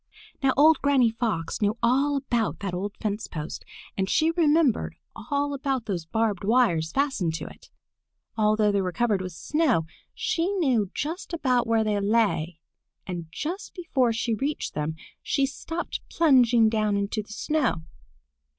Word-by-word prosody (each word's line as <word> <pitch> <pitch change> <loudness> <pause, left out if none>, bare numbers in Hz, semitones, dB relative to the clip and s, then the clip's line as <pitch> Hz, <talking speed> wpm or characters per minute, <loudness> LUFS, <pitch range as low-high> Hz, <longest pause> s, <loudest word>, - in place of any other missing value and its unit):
Now 270 -1 +3
old 310 +1 +6
Granny 270 -5 +3
Fox 220 -9 -2
knew 210 +2 +1
all 275 +5 +3
about 240 -5 -1
that 195 -3 -3
old 195 +3 -4
fence 210 0 -3
post 155 -2 -6 0.3
and 190 0 -1
she 320 +1 +3
remembered 320 -5 +2 0.2
all 285 0 -2
about 270 -3 -2
those 175 -6 -3
barbed 215 0 0
wires 200 -8 +2
fastened 265 - 0
to - - -5
it. - - -13 0.7
Although 215 -1 +3
they 200 -1 +1
were 185 -1 -2
covered 210 +1 +1
with 185 -1 -6
snow 270 - +1 0.3
she 335 +1 0
knew 255 - +1
just 330 +5 -4
about 255 -7 +1
where 225 -1 +3
they 210 -1 0
lay, 200 -6 +1 0.5
and 175 -3 -5
just 340 - -5
before 270 - +1
she 230 +1 -1
reached 280 +7 -2
them 150 +1 -2 0.3
she 275 -2 +1
stopped 325 +5 -5
plunging 245 -8 +4
down 215 -2 +1
into 200 +2 -1
the 210 - -15
snow. 255 - 0
230 Hz, 155 wpm, -26 LUFS, 200-280 Hz, 0.7 s, old